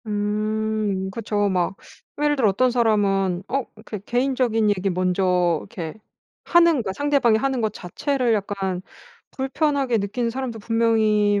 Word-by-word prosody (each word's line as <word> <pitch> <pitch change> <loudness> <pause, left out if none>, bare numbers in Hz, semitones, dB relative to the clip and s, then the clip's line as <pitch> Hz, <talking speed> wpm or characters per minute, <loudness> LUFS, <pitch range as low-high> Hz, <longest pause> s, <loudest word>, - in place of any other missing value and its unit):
음 210 -1 -1
그쵸. 205 -1 -1
막 180 0 0 0.5
예를 295 0 +3
들어 240 -7 +3
어떤 250 +6 +2
사람은 200 -6 +1
어 275 0 -1
이렇게 215 -1 -8
개인적인 240 -1 +1
얘기 195 -1 0
먼저 180 -2 +1
이렇게 165 -5 -7 0.5
하는 340 -5 +4
것 190 -4 -4
상대방이 280 -5 +3
하는 265 0 -1
것 220 -1 0
자체를 250 - -1
약간 195 -3 -2 0.5
불편하게 270 -2 0
느끼는 215 +4 -2
사람도 250 -2 -4
분명히 215 -2 +2
215 Hz, 295 characters per minute, -23 LUFS, 195-250 Hz, 0.5 s, 하는